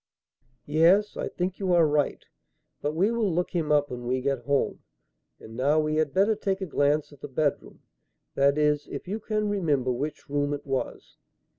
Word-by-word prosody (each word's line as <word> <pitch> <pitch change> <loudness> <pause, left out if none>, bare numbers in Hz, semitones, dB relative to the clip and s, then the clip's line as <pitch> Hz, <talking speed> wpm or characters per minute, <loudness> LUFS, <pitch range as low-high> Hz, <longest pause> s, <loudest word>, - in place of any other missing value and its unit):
"Yes, 170 +8 +3
I - - -3
think 180 +1 -3
you 190 -3 +1
are 170 -2 +5
right; 150 -1 0 0.6
but 150 +1 -2
we 195 +7 +2
will 230 -5 0
look 175 +2 -1
him 160 -4 -1
up 145 -1 +2
when 120 -1 -6
we 130 +1 +1
get 130 -2 -2
home. 140 0 0 0.6
And 110 - -12
now 140 +5 +2
we 155 0 0
had 155 -2 +1
better 200 +6 +3
take 195 -2 -2
a 190 - -3
glance 145 -2 +1
at 145 - -18
the - - -6
bedroom; 145 +1 -2 0.5
that 140 +1 +3
is, 150 -1 +1
if - - -7
you 210 +4 -3
can 215 0 -1
remember 150 -11 0
which 145 +5 -4
room 145 0 0
it 145 - -10
was." 135 -2 -4
150 Hz, 190 wpm, -26 LUFS, 140-185 Hz, 0.6 s, are